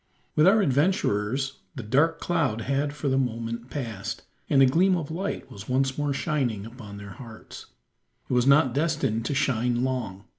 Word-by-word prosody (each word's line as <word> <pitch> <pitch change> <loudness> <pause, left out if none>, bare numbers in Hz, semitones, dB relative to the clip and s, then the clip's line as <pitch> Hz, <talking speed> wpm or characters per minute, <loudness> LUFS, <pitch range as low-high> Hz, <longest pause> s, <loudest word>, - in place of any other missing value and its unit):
With 155 +3 +5
our 205 +2 +5
adventurers 135 - +1 0.2
the 125 - -5
dark 145 +9 +2
cloud 145 -10 0
had 140 +4 0
for 150 0 -4
the 135 0 +2
moment 115 -1 -3
passed; 115 -9 -5 0.3
and 140 - +4
a - - +8
gleam 180 +8 +3
of 160 -2 -5
light 190 +5 -4
was 100 +3 -10
once 135 +1 +1
more 145 -1 -1
shining 135 - -1
upon 110 -3 -10
their 100 0 -9
hearts. 115 0 -11 0.6
It - - -3
was 125 +1 +3
not 140 -3 +5
destined 145 -7 0
to 140 - -1
shine 125 -3 +1
long. 115 -7 -3
130 Hz, 175 wpm, -26 LUFS, 115-145 Hz, 0.6 s, a